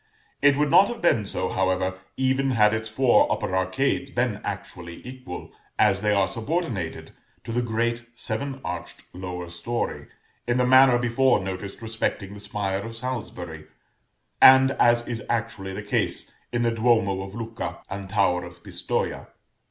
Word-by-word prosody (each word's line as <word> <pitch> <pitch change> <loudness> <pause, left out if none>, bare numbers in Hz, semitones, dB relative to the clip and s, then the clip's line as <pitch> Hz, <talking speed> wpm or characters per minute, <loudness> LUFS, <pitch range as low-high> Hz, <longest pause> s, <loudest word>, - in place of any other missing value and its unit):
It 145 -1 +6
would 150 -1 +1
not 195 - +7
have 240 - -5
been 115 - +2
so, 95 - -1
however, 95 0 0 0.2
even 130 +1 +1
had 105 -4 +4
its 110 0 -2
four 125 +3 +4
upper 95 - -1
arcades 95 +9 0
been 120 -5 -1
actually 90 -3 -7
equal; 125 -8 -8 0.3
as 95 0 +3
they 105 0 +2
are 100 -2 +3
subordinated 115 - -3 0.3
to 115 - -6
the 120 +2 +1
great 120 0 -1
seven 130 +4 -4
arched 85 -1 -6
lower 90 -1 -6
story, 115 +8 -4 0.4
in 120 +1 +2
the 125 - +3
manner 130 0 +7
before 125 0 +3
noticed 95 +2 -6
respecting 110 -3 -3
the 105 - -9
spire 100 -1 -2
of 115 +3 -7
Salisbury, 90 -10 -5 0.7
and 130 0 +8
as 120 0 +4
is 120 -1 -3
actually 110 -4 -2
the - - -5
case - - -1 0.2
in 120 0 0
the 115 - +2
Duomo 110 -4 +2
of 95 +1 -8
Lucca 115 0 -5
and 95 0 -6
Tower 95 -3 +2
of 85 0 -12
Pistoja. - - -2
110 Hz, 160 wpm, -25 LUFS, 95-125 Hz, 0.7 s, and